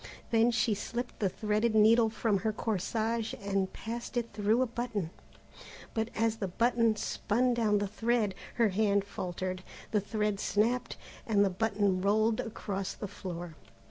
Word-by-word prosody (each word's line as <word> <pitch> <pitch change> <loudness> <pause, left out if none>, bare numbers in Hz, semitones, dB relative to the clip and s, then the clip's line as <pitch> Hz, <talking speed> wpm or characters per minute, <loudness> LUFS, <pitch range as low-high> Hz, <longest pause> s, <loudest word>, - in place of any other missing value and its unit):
Then 230 +1 +5
she 230 -1 +2
slipped 240 +4 -4
the 200 - +2
threaded 215 +3 0
needle 225 +1 +6
from 215 -2 0
her 220 +4 0
corsage 220 +2 -1
and 195 -1 -1
passed 235 +2 -5
it 230 -2 -2
through 215 +4 +2
a - - +1
button, 230 -7 -3 0.8
but 220 0 -1
as 225 0 +1
the 200 - -2
button 230 +3 +2
spun 240 +4 0
down 220 -3 +2
the 205 0 0
thread, 220 0 0 0.2
her 230 -3 +3
hand 200 0 +2
faltered, 185 -1 -4 0.3
the 210 - +2
thread 210 0 -1
snapped, 235 +5 0 0.3
and 205 -3 +4
the 195 - +1
button 200 -1 +1
rolled 215 +3 +2
across 200 -3 -4
the 205 - -5
floor. 175 -4 -7
215 Hz, 155 wpm, -31 LUFS, 200-230 Hz, 0.8 s, needle